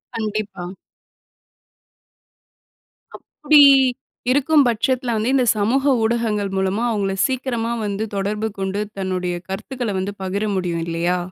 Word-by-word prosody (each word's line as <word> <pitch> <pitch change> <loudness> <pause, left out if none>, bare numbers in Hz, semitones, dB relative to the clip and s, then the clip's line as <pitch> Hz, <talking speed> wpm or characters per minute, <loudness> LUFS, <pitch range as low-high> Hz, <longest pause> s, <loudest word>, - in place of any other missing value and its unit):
கண்டிப்பா. 210 -5 -4 2.5
அப்படி 300 -1 +2 0.7
இருக்கும் 285 +1 +4
பட்சத்துல 240 +2 0
வந்து, 235 +5 0
இந்த 255 -2 +3
சமூக 265 +7 +2
ஊடகங்கள் 220 -4 0
மூலமா 190 +4 0
அவுங்கள 200 -3 -1
சீக்கிரமா 245 -3 -2
வந்து 205 +2 -2
தொடர்பு 210 +3 -2
கொண்டு, 195 +2 -2 0.2
தன்னுடைய 180 -2 -2
கருத்துக்கள 225 +2 -4
வந்து 200 +2 -3
பகிர 200 +3 -2
முடியும், 170 -3 -2
இல்லையா? 170 +2 0
210 Hz, 105 wpm, -20 LUFS, 190-240 Hz, 2.5 s, இருக்கும்